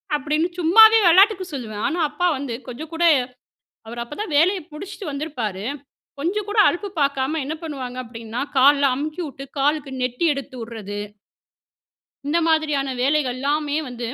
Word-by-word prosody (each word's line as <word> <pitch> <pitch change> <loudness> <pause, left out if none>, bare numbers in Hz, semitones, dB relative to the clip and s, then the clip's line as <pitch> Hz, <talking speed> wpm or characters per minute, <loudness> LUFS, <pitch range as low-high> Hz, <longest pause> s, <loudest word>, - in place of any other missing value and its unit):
அப்படீன்னு 300 +4 0
சும்மாவே 440 +7 +7
விளாட்டுக்கு 380 +2 +5
சொல்லுவேன். 215 -5 -5
ஆனா 345 - -2
அப்பா 355 +4 0
வந்து 265 -3 -5
கொஞ்சம் 295 +6 -8
கூட 340 +1 -1 0.8
அவர் 235 +1 -6
அப்ப 240 - -10
தான் 350 -8 -4
வேலைய 370 +5 +3
முடிச்சுட்டு 390 +4 -8
வந்திருப்பாரு 245 -10 -4 0.5
கொஞ்சம் 385 +7 -2
கூட 425 - -4
அலுப்பு 400 +3 -1
பாக்காம 280 +2 0
என்ன 310 +3 -3
பண்ணுவாங்க 265 -6 -6
அப்படின்னா, 230 0 -6 0.2
கால்லாம் 280 0 +5
அமுக்கிவிட்டு, 300 -1 -5
காலுக்கு 285 0 0
நெட்டி 250 +6 -1
எடுத்து 275 -2 -7
ட்றது 205 -3 -6 1.3
இந்த 320 +3 +2
மாதிரியான 300 -4 +1
வேலைகள் 275 -2 +1
எல்லாமே 290 +2 -1
வந்து, 240 -2 -5
290 Hz, 140 wpm, -22 LUFS, 255-325 Hz, 1.3 s, சும்மாவே